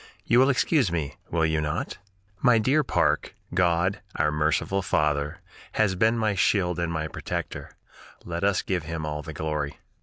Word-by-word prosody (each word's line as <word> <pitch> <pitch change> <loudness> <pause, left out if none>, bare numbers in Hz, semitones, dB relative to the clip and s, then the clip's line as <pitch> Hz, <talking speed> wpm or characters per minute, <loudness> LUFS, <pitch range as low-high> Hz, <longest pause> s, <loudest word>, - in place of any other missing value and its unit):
You 120 - +4
will 130 +2 +5
excuse 135 - +2
me, 80 -5 -2 0.2
will 80 -1 +1
you 80 -1 +1
not? 75 0 -3 0.4
"My 125 -3 +5
dear 135 +8 +3
Parke, 125 - +1 0.2
God, 90 +1 +2
our 75 0 +2
merciful 75 +6 +1
Father, 75 -4 0 0.3
has 110 -3 +2
been 110 +5 +2
my 110 -2 +1
shield 90 -2 +1
and 85 -1 -1
my 80 -1 -2
protector; - - -5 0.5
let 85 +1 -4
us 100 0 +2
give 90 -2 -1
Him 80 -1 -4
all 75 0 -3
the 80 - -7
glory. 75 -1 -3
85 Hz, 170 wpm, -26 LUFS, 75-100 Hz, 0.5 s, will